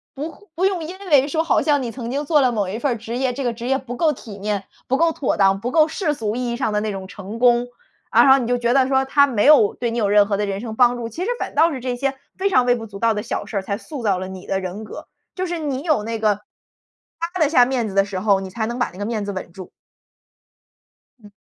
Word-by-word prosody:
不 295 Hz, +4 st, -4 dB
会 -, -, -18 dB, 0.2 s
不 360 Hz, +4 st, +1 dB
用 375 Hz, -4 st, 0 dB
因 365 Hz, +4 st, -8 dB
为 280 Hz, -2 st, +5 dB
说 320 Hz, +2 st, 0 dB
好 330 Hz, -, +2 dB
像 290 Hz, -3 st, +2 dB
你 235 Hz, -, -4 dB
曾 235 Hz, 0 st, -6 dB
经 285 Hz, +2 st, -2 dB
做 300 Hz, 0 st, +3 dB
了 255 Hz, -2 st, +3 dB
某 205 Hz, -4 st, -1 dB
一 210 Hz, +4 st, -4 dB
份 270 Hz, 0 st, 0 dB
儿 -, -, -4 dB
职 225 Hz, +2 st, -5 dB
业， 255 Hz, -1 st, 0 dB
这 275 Hz, -, -4 dB
个 240 Hz, -, 0 dB
职 235 Hz, +1 st, -6 dB
业 265 Hz, +1 st, +2 dB
不 245 Hz, -2 st, -7 dB
够 315 Hz, -2 st, +2 dB
体 215 Hz, -6 st, -11 dB
面， 205 Hz, 0 st, -2 dB, 0.2 s
不 265 Hz, -, +1 dB
够 335 Hz, +1 st, +3 dB
妥 280 Hz, -, -1 dB
当， 195 Hz, -1 st, +3 dB
不 245 Hz, -, -2 dB
够 315 Hz, 0 st, +5 dB
世 320 Hz, -1 st, -1 dB
俗 220 Hz, -5 st, -3 dB
意 250 Hz, -1 st, -2 dB
义 -, -, -2 dB
上 220 Hz, -5 st, -1 dB
的 210 Hz, -, +2 dB
那 215 Hz, 0 st, -2 dB
种 190 Hz, -1 st, -6 dB
成 200 Hz, +2 st, -8 dB
功。 240 Hz, 0 st, +4 dB, 0.4 s
然 235 Hz, +4 st, +6 dB
后 265 Hz, +1 st, +7 dB
你 235 Hz, -, -3 dB
就 245 Hz, 0 st, +1 dB
觉 240 Hz, 0 st, +1 dB
得 265 Hz, -1 st, +4 dB
说 265 Hz, 0 st, +2 dB
他 280 Hz, +1 st, +4 dB
没 230 Hz, -5 st, 0 dB
有 285 Hz, -9 st, +6 dB
对 240 Hz, -1 st, -2 dB
你 235 Hz, -, -2 dB
有 205 Hz, -2 st, +1 dB
任 205 Hz, 0 st, +5 dB
何 200 Hz, -1 st, -1 dB
的 210 Hz, -, 0 dB
人 195 Hz, 0 st, -3 dB
生 225 Hz, -2 st, -6 dB
帮 245 Hz, 0 st, +4 dB
助， 230 Hz, -1 st, -5 dB
其 325 Hz, +11 st, -7 dB
实 435 Hz, -, -2 dB
反 -, -, -4 dB
倒 330 Hz, +1 st, +4 dB
是 265 Hz, -, -4 dB
这 250 Hz, 0 st, -3 dB
些 275 Hz, +2 st, -1 dB, 0.2 s
非 395 Hz, +1 st, +1 dB
常 255 Hz, -9 st, +3 dB
微 245 Hz, -, +4 dB
不 225 Hz, -2 st, -7 dB
足 200 Hz, -1 st, -10 dB
道 230 Hz, -1 st, +2 dB
的 210 Hz, -, -3 dB
小 -, -, -4 dB
事 205 Hz, -, -4 dB
儿， -, -, 0 dB
才 200 Hz, +1 st, -3 dB
塑 280 Hz, +4 st, -8 dB
造 200 Hz, -4 st, +2 dB
了 185 Hz, -, -5 dB
你 190 Hz, -1 st, -9 dB
的 195 Hz, -, 0 dB
人 190 Hz, +3 st, -6 dB
格。 -, -, -9 dB, 0.3 s
就 370 Hz, 0 st, -2 dB
是 345 Hz, -1 st, -3 dB
你 280 Hz, -2 st, -3 dB
有 310 Hz, -9 st, +2 dB
那 225 Hz, +1 st, -3 dB
个 210 Hz, -2 st, +1 dB, 0.8 s
趴 340 Hz, +2 st, -4 dB
得 310 Hz, -, +5 dB
下 250 Hz, -6 st, +5 dB
面 245 Hz, -3 st, -1 dB
子 195 Hz, -, -6 dB
的 195 Hz, -, +5 dB
时 195 Hz, -2 st, -4 dB
候， 200 Hz, 0 st, +3 dB
你 190 Hz, -, -6 dB
才 220 Hz, +4 st, -3 dB
能 240 Hz, +2 st, -4 dB
把 245 Hz, -, 0 dB
那 180 Hz, -, -14 dB
个 205 Hz, -, -3 dB
面 220 Hz, -2 st, -2 dB
子 200 Hz, -, -3 dB
稳 185 Hz, -2 st, -6 dB
住。 185 Hz, +1 st, -10 dB, 1.5 s
嗯。 205 Hz, -, -14 dB
240 Hz, 320 characters per minute, -21 LUFS, 210-275 Hz, 1.5 s, 后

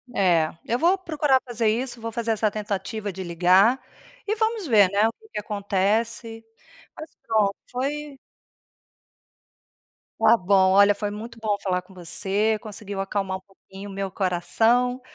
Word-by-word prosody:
É, 170 Hz, -5 st, +3 dB, 0.2 s
eu 240 Hz, +2 st, -1 dB
vou 355 Hz, +4 st, +3 dB
procurar 300 Hz, -7 st, +1 dB
fazer 230 Hz, -2 st, -1 dB
isso, 240 Hz, +1 st, -2 dB
vou 230 Hz, -, -4 dB
fazer 230 Hz, 0 st, -2 dB
essa 215 Hz, -1 st, +1 dB
tentativa 205 Hz, 0 st, -4 dB
de 190 Hz, +1 st, -6 dB
ligar, 185 Hz, +8 st, +4 dB, 0.5 s
e 430 Hz, -, 0 dB
vamos 440 Hz, -3 st, -1 dB
ver, 205 Hz, -6 st, +5 dB
né, 205 Hz, +2 st, +3 dB
o 230 Hz, -, -3 dB
que 435 Hz, -, -22 dB
que -, -, -4 dB
acontece. 215 Hz, +3 st, -1 dB, 0.5 s
Mas 310 Hz, 0 st, -8 dB, 0.2 s
pronto, 210 Hz, -3 st, +2 dB, 0.2 s
foi 280 Hz, +2 st, -4 dB, 2.0 s
Está 235 Hz, -, +6 dB
bom 190 Hz, 0 st, +3 dB
olha 200 Hz, +1 st, +6 dB
foi 205 Hz, 0 st, -3 dB
muito 225 Hz, +3 st, -8 dB
bom 210 Hz, -2 st, 0 dB
falar 180 Hz, -2 st, 0 dB
com 190 Hz, +1 st, -19 dB
você, 200 Hz, +4 st, 0 dB
conseguiu 205 Hz, -2 st, -7 dB
acalmar 195 Hz, -1 st, -2 dB
um -, -, -15 dB
pouquinho 195 Hz, +1 st, -13 dB
o 195 Hz, -, -9 dB
meu 195 Hz, -1 st, -4 dB
coração, 225 Hz, +8 st, +1 dB
210 Hz, 155 wpm, -24 LUFS, 195-240 Hz, 2.0 s, Está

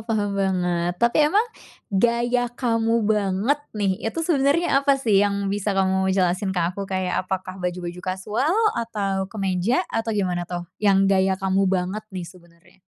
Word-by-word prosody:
paham 205 Hz, -2 st, 0 dB
banget, 180 Hz, -2 st, 0 dB
tapi 235 Hz, +9 st, +2 dB
emang 410 Hz, +8 st, +3 dB, 0.5 s
gaya 240 Hz, +4 st, +2 dB
kamu 230 Hz, -2 st, 0 dB
banget 210 Hz, +6 st, +1 dB, 0.2 s
nih. 200 Hz, -2 st, +1 dB, 0.2 s
Itu 330 Hz, +7 st, -3 dB
sebenarnya 285 Hz, -1 st, +2 dB
apa 280 Hz, -1 st, +3 dB
sih 220 Hz, -7 st, +3 dB
yang 200 Hz, -1 st, 0 dB
bisa 205 Hz, -1 st, -1 dB
kamu 190 Hz, 0 st, +2 dB
jelasin 185 Hz, +1 st, +1 dB
ke 190 Hz, -2 st, -1 dB
aku 195 Hz, +1 st, -6 dB
kayak, 185 Hz, -1 st, -1 dB
apakah 185 Hz, 0 st, -4 dB
baju-baju 180 Hz, 0 st, -4 dB
kasual 210 Hz, -, -1 dB, 0.2 s
atau 200 Hz, -5 st, -2 dB
kemeja? 195 Hz, -, 0 dB
Atau 225 Hz, -1 st, -1 dB
gimana 180 Hz, -3 st, -1 dB
tuh, 175 Hz, -1 st, -4 dB, 0.2 s
yang 195 Hz, -2 st, +4 dB
gaya 190 Hz, -1 st, +2 dB
kamu 195 Hz, 0 st, +1 dB
banget 185 Hz, +2 st, -1 dB
nih 185 Hz, -2 st, -6 dB
,sebenarnya? 170 Hz, +1 st, -18 dB
195 Hz, 155 wpm, -23 LUFS, 185-230 Hz, 0.5 s, yang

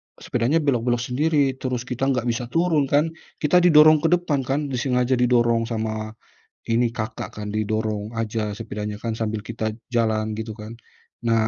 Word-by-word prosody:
sepedanya 130 Hz, +7 st, 0 dB
belok-belok 120 Hz, -3 st, +1 dB
sendiri, 145 Hz, 0 st, +2 dB
terus 125 Hz, -2 st, -2 dB
kita 130 Hz, +1 st, -2 dB
nggak 125 Hz, -3 st, +1 dB
bisa 120 Hz, +1 st, -3 dB
turun 160 Hz, +1 st, +1 dB
kan, 150 Hz, +4 st, +2 dB, 0.3 s
kita 165 Hz, +4 st, +5 dB
didorong 155 Hz, -3 st, +7 dB
ke 165 Hz, -, +1 dB
depan 170 Hz, -5 st, -1 dB
kan, 135 Hz, +2 st, +1 dB
disengaja 125 Hz, 0 st, +1 dB
didorong 120 Hz, -2 st, +3 dB
sama 110 Hz, -1 st, -3 dB, 0.5 s
ini, 115 Hz, 0 st, +2 dB
kakak 110 Hz, -1 st, -5 dB
kan, 105 Hz, -, -5 dB
didorong 110 Hz, 0 st, -2 dB
aja 110 Hz, -1 st, -2 dB
sepedanya 105 Hz, -1 st, -5 dB
kan, 115 Hz, -1 st, -3 dB
sambil 110 Hz, -1 st, -2 dB
kita 110 Hz, 0 st, -4 dB, 0.2 s
jalan, 110 Hz, -3 st, 0 dB
gitu 110 Hz, 0 st, -5 dB
kan. 110 Hz, +1 st, -9 dB, 0.5 s
Nah, 115 Hz, -1 st, +2 dB
120 Hz, 155 wpm, -23 LUFS, 110-135 Hz, 0.5 s, didorong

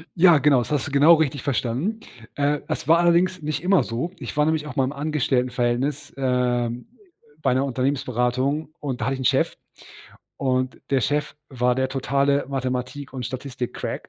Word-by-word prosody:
Ja, 170 Hz, -2 st, +6 dB
genau. 140 Hz, -1 st, +4 dB
Das 120 Hz, -, -2 dB
hast 145 Hz, -4 st, 0 dB
du -, -, -7 dB
genau 145 Hz, +4 st, +7 dB
richtig 145 Hz, -4 st, 0 dB
verstanden. 140 Hz, -, -1 dB, 0.3 s
Äh, 145 Hz, 0 st, +1 dB
es -, -, -3 dB
war 165 Hz, +1 st, +6 dB
allerdings 175 Hz, +1 st, +2 dB
nicht 150 Hz, 0 st, -3 dB
immer 185 Hz, 0 st, +4 dB
so. 120 Hz, +9 st, -3 dB
Ich -, -, -7 dB
war 150 Hz, -, +4 dB
nämlich 155 Hz, -1 st, 0 dB
auch 145 Hz, -, -7 dB
mal 135 Hz, -, +3 dB
im 130 Hz, -, -2 dB
Angestelltenverhältnis, 135 Hz, -2 st, -1 dB
ähm, 125 Hz, -2 st, 0 dB
äh, -, -, -29 dB, 0.4 s
bei -, -, +2 dB
'ner 130 Hz, +2 st, +1 dB
Unternehmensberatung 130 Hz, +2 st, -1 dB
und 135 Hz, -4 st, -4 dB
da -, -, -1 dB
hatte 135 Hz, -, 0 dB
ich 135 Hz, -, -6 dB
'n -, -, -4 dB
Chef. -, -, +2 dB, 0.8 s
Und 130 Hz, -1 st, -1 dB
der 135 Hz, -1 st, +3 dB
Chef 145 Hz, +6 st, -1 dB
war 125 Hz, -2 st, +1 dB
der 130 Hz, +1 st, 0 dB
totale 140 Hz, +1 st, +1 dB
Mathematik 130 Hz, +1 st, -3 dB
und 130 Hz, -2 st, -4 dB
Statistikcrack. 130 Hz, 0 st, -5 dB
135 Hz, 180 wpm, -23 LUFS, 125-150 Hz, 0.8 s, genau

